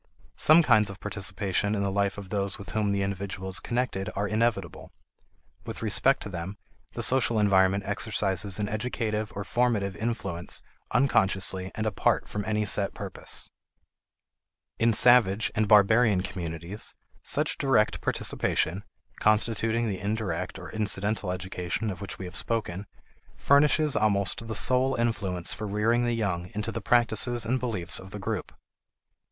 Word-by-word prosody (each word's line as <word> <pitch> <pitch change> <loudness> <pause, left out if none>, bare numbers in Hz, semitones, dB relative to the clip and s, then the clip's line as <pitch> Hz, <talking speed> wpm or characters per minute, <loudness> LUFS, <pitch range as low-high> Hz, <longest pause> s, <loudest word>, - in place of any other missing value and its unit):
Some 160 +2 +6
kinds 110 -7 +4
of 100 0 -9
participation 100 0 -1
in 100 - -1
the 100 - -1
life 100 0 0
of 100 -2 -9
those 100 -1 -2
with 100 - -9
whom 105 -2 0
the 100 -1 0
individual 95 -1 -4
is 95 - 0
connected 120 -6 -2
are 105 +1 -1
inevitable; 110 -5 -2 0.7
with - - -7
respect 130 +5 +2
to - - -7
them, 90 +2 -6 0.4
the - - -3
social 125 -3 +3
environment 100 -1 +3
exercises 100 -3 -1
an 105 -1 -2
educative 110 -1 -3
or 100 - -4
formative 105 -3 0
influence 100 -5 -1 0.3
unconsciously 95 -7 +1
and 110 - -3
apart 110 - 0
from 105 - -4
any 105 0 0
set 100 0 0
purpose. - - -5 1.3
In 115 0 +3
savage 110 -3 +4
and 110 -1 0
barbarian 105 0 +5
communities, 85 +1 -5 0.3
such - - +1
direct 125 -6 +2
participation 95 +5 0 0.4
(constituting 115 +2 +1
the 95 -3 -3
indirect 105 +1 -3
or - - -9
incidental 105 -2 -1
education 90 +3 -3
of 90 - -9
which 100 - -6
we 95 - -7
have 90 -1 -9
spoken) 105 -2 -2 0.5
furnishes 150 +1 +3
almost 105 +2 +1
the 110 - -4
sole 130 +3 +5
influence 100 -7 -1
for 110 - -5
rearing 115 +4 +1
the 120 - 0
young 90 -5 -2
into 105 +2 -2
the - - -5
practices 120 0 +2
and 130 +3 0
beliefs 110 -9 -1
of 95 - -11
the 105 - -7
group. 95 - -4
105 Hz, 150 wpm, -27 LUFS, 95-115 Hz, 1.3 s, Some